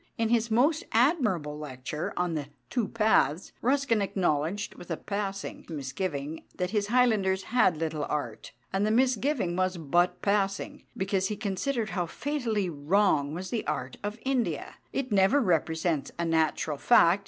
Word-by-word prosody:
In 225 Hz, -1 st, +1 dB
his 230 Hz, -1 st, +2 dB
most 280 Hz, +8 st, +3 dB
admirable 215 Hz, -, +2 dB
lecture 145 Hz, +1 st, -5 dB
on 180 Hz, -1 st, 0 dB
"The 150 Hz, -3 st, -3 dB, 0.2 s
Two 240 Hz, -5 st, 0 dB
Paths," 210 Hz, -7 st, +2 dB
Ruskin 260 Hz, -3 st, +2 dB
acknowledged, 185 Hz, 0 st, 0 dB
with 175 Hz, -, -12 dB
a 165 Hz, -, -2 dB
passing 200 Hz, -1 st, -4 dB
misgiving, 145 Hz, +1 st, -4 dB
that 180 Hz, 0 st, -2 dB
his 210 Hz, -2 st, 0 dB
Highlanders 210 Hz, -6 st, +3 dB
had 220 Hz, -9 st, +3 dB
little 155 Hz, -2 st, -2 dB
art. 135 Hz, -7 st, -4 dB, 0.2 s
And 195 Hz, +1 st, +1 dB
the 210 Hz, -, +2 dB
misgiving 250 Hz, -, +2 dB
was 185 Hz, 0 st, 0 dB
but 175 Hz, +3 st, +1 dB
passing, 200 Hz, -1 st, 0 dB
because 190 Hz, 0 st, 0 dB
he 210 Hz, -, -3 dB
considered 220 Hz, +3 st, -2 dB
how 175 Hz, -3 st, -1 dB
fatally 230 Hz, -, -1 dB
wrong 155 Hz, -1 st, +1 dB
was 185 Hz, +2 st, -5 dB
the 230 Hz, -3 st, -1 dB
art -, -, -3 dB
of 205 Hz, +2 st, -3 dB
India 260 Hz, -3 st, -1 dB
"it 260 Hz, -3 st, -3 dB
never 200 Hz, +7 st, +4 dB
represents 160 Hz, -, 0 dB
a 170 Hz, -, -1 dB
natural 160 Hz, -2 st, +1 dB
fact. 190 Hz, -5 st, +5 dB
195 Hz, 155 wpm, -28 LUFS, 160-225 Hz, 0.2 s, fact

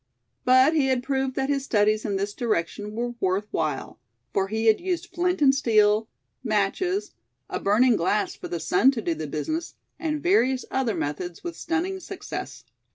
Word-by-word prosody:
But 255 Hz, +4 st, +6 dB
he 295 Hz, -4 st, +2 dB
had 255 Hz, -2 st, +1 dB
proved 265 Hz, -1 st, -1 dB
that 270 Hz, 0 st, 0 dB
his 280 Hz, -1 st, 0 dB
studies 215 Hz, -3 st, +2 dB
in 205 Hz, -3 st, -1 dB
this 200 Hz, +1 st, -2 dB
direction 210 Hz, -2 st, -2 dB
were 240 Hz, +2 st, -2 dB
worth 190 Hz, +1 st, 0 dB
while; -, -, -2 dB, 0.3 s
for 195 Hz, 0 st, +1 dB
he 220 Hz, +2 st, -2 dB
had 220 Hz, -1 st, +4 dB
used 350 Hz, -1 st, -2 dB
flint 355 Hz, -2 st, +1 dB
and 270 Hz, -1 st, +6 dB
steel, 215 Hz, -4 st, +3 dB, 0.4 s
matches, 240 Hz, -, 0 dB, 0.4 s
a -, -, -2 dB
burning 225 Hz, +3 st, +4 dB
glass 205 Hz, +5 st, 0 dB
for -, -, -8 dB
the 170 Hz, -, -3 dB
sun 180 Hz, +10 st, +4 dB
to 230 Hz, -, -3 dB
do 170 Hz, -, 0 dB
the 155 Hz, -1 st, -5 dB
business, 315 Hz, -, -3 dB, 0.2 s
and 305 Hz, -3 st, -1 dB
various 265 Hz, -, +2 dB
other 255 Hz, -5 st, 0 dB
methods 165 Hz, +4 st, -4 dB
with 345 Hz, -1 st, -5 dB
stunning 345 Hz, +4 st, -2 dB
success. 380 Hz, +1 st, -7 dB
240 Hz, 175 wpm, -25 LUFS, 205-300 Hz, 0.4 s, But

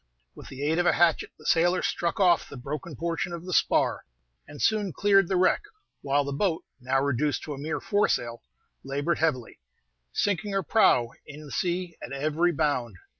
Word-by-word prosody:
With -, -, -12 dB
the 135 Hz, +1 st, -7 dB
aid 160 Hz, +3 st, +1 dB
of 175 Hz, -, +2 dB
a -, -, +5 dB
hatchet, 170 Hz, -1 st, +2 dB
the -, -, -17 dB
sailor 175 Hz, +2 st, +3 dB
struck 170 Hz, +2 st, -1 dB
off 180 Hz, -3 st, +3 dB
the -, -, -9 dB
broken 145 Hz, +4 st, -6 dB
portion 170 Hz, +3 st, -3 dB
of 170 Hz, 0 st, -7 dB
the 185 Hz, -, -4 dB
spar, -, -, +2 dB, 0.4 s
and 145 Hz, 0 st, -11 dB
soon 210 Hz, -3 st, +1 dB
cleared 195 Hz, +2 st, +3 dB
the 190 Hz, -, 0 dB
wreck, 185 Hz, +1 st, +3 dB, 0.4 s
while 140 Hz, +1 st, +1 dB
the 140 Hz, 0 st, -4 dB
boat, 165 Hz, +2 st, -1 dB
now 130 Hz, +1 st, 0 dB
reduced 140 Hz, +1 st, 0 dB
to 150 Hz, -, -5 dB
a 135 Hz, -, -8 dB
mere 150 Hz, +1 st, -3 dB
foresail, 120 Hz, -, 0 dB, 0.4 s
labored 145 Hz, +5 st, -1 dB
heavily, 130 Hz, -, -1 dB, 0.5 s
sinking 205 Hz, 0 st, -1 dB
her 195 Hz, -1 st, 0 dB
prow 120 Hz, -5 st, +3 dB, 0.2 s
in 150 Hz, 0 st, -10 dB
the 145 Hz, -, -11 dB
sea 175 Hz, +5 st, -2 dB
at -, -, -7 dB
every 155 Hz, +5 st, +1 dB
bound. 140 Hz, -, -1 dB
160 Hz, 185 wpm, -27 LUFS, 140-175 Hz, 0.5 s, a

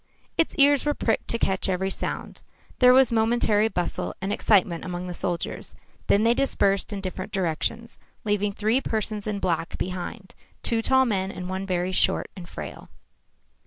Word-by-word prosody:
Its 330 Hz, -, +1 dB
ears 285 Hz, -1 st, +5 dB
were 295 Hz, 0 st, 0 dB
pricked 225 Hz, -, 0 dB
to 230 Hz, -, +1 dB
catch 190 Hz, -3 st, 0 dB
every 190 Hz, +1 st, 0 dB
sound. -, -, -5 dB, 0.4 s
There 250 Hz, -1 st, +8 dB
was 260 Hz, -1 st, +5 dB
momentary 220 Hz, -2 st, +3 dB
bustle 180 Hz, -5 st, -3 dB
and 195 Hz, +2 st, -2 dB
excitement 185 Hz, -6 st, +2 dB
among 180 Hz, -1 st, -4 dB
the 180 Hz, -, -5 dB
soldiers. 170 Hz, 0 st, -3 dB, 0.3 s
Then 205 Hz, -, +4 dB
they 230 Hz, +1 st, +5 dB
dispersed 200 Hz, -8 st, +1 dB
in 200 Hz, -1 st, -4 dB
different 185 Hz, 0 st, -5 dB
directions, 195 Hz, +6 st, -2 dB, 0.3 s
leaving 205 Hz, -1 st, +1 dB
three 220 Hz, +5 st, +1 dB
persons 215 Hz, -2 st, -3 dB
in 210 Hz, -1 st, -1 dB
black 170 Hz, -4 st, -1 dB
behind, 185 Hz, +1 st, -5 dB, 0.3 s
two 230 Hz, -1 st, +1 dB
tall 265 Hz, +3 st, +4 dB
men 195 Hz, -5 st, -1 dB
and 180 Hz, -2 st, -6 dB
one 190 Hz, +1 st, -4 dB
very 180 Hz, 0 st, 0 dB
short 185 Hz, -, +1 dB
and 175 Hz, -2 st, -10 dB
frail. 75 Hz, -3 st, -8 dB
200 Hz, 165 wpm, -25 LUFS, 185-230 Hz, 0.4 s, There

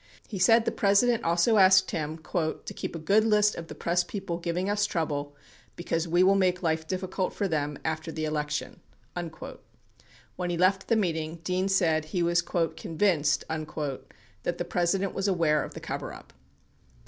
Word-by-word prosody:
He 200 Hz, -, -5 dB
said 225 Hz, +4 st, +5 dB
the -, -, +1 dB
President 215 Hz, +4 st, +3 dB
also 170 Hz, +7 st, +3 dB
asked 190 Hz, -1 st, +6 dB
him 155 Hz, 0 st, -3 dB
"to 160 Hz, -3 st, -3 dB
keep -, -, -5 dB
a -, -, -2 dB
good 195 Hz, +7 st, +3 dB
list 210 Hz, -1 st, +3 dB
of 165 Hz, -, -7 dB
the -, -, -9 dB
press 175 Hz, +1 st, +1 dB
people 190 Hz, -3 st, -5 dB
giving 175 Hz, +2 st, -2 dB
us 205 Hz, 0 st, +1 dB
trouble, 145 Hz, -5 st, -2 dB, 0.4 s
because 165 Hz, -1 st, -2 dB
we 175 Hz, +2 st, +3 dB
will 190 Hz, +1 st, +5 dB
make 185 Hz, -2 st, +1 dB
life 160 Hz, -1 st, 0 dB
difficult 185 Hz, +1 st, -2 dB
for 200 Hz, -, -1 dB
them 150 Hz, -4 st, -2 dB
after 160 Hz, +1 st, -2 dB
the 155 Hz, -1 st, -3 dB
election." 150 Hz, -1 st, -3 dB, 0.4 s
36 170 Hz, -2 st, -7 dB, 0.8 s
When 180 Hz, -1 st, -2 dB
he 175 Hz, -, -1 dB
left 190 Hz, +2 st, +2 dB
the 230 Hz, -, +3 dB
meeting, 165 Hz, -6 st, -1 dB
Dean 185 Hz, +2 st, 0 dB
said, 165 Hz, -5 st, +2 dB
he 175 Hz, +3 st, -1 dB
was 170 Hz, +1 st, +3 dB
"convinced" 165 Hz, -2 st, 0 dB
that 155 Hz, +1 st, -5 dB
the 175 Hz, -, -3 dB
President 180 Hz, +3 st, 0 dB
was 195 Hz, +1 st, -1 dB
aware 165 Hz, -5 st, +2 dB
of -, -, -9 dB
the -, -, -6 dB
coverup. -, -, -7 dB
175 Hz, 170 wpm, -27 LUFS, 160-195 Hz, 0.8 s, asked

